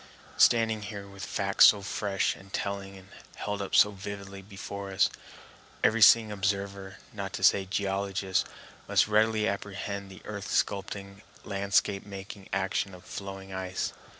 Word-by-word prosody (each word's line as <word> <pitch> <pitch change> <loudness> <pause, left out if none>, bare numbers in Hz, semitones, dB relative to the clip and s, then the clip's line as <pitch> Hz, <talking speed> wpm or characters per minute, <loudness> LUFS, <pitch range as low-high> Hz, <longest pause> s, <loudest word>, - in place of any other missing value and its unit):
Standing 110 -2 +4
here, 105 -1 -6
with 100 -1 -10
facts 100 0 +5
so 100 -2 +4
fresh 100 -1 -1
and 95 0 -15
telling 100 -1 -4
and 95 +1 -15 0.3
held 105 -1 -3
up 100 - -2
so 105 - +7
vividly 100 0 -7
before 100 0 -7
us, 95 - +3 0.7
every 115 +1 +3
seeing 110 0 +7
observer, 100 -1 -2 0.2
not 100 -3 -5
to - - -5
say 95 +1 +5
geologist, 95 -1 -1 0.4
must - - +4
readily 110 0 +3
apprehend 100 0 -4
the 95 - -13
earth 100 -2 -6
sculpturing, 100 0 -2 0.2
landscape 100 0 +1
making 100 0 -9
action 95 0 -1
of 90 0 -15
flowing 95 -1 -7
ice. 95 0 -3
100 Hz, 145 wpm, -29 LUFS, 95-100 Hz, 0.7 s, so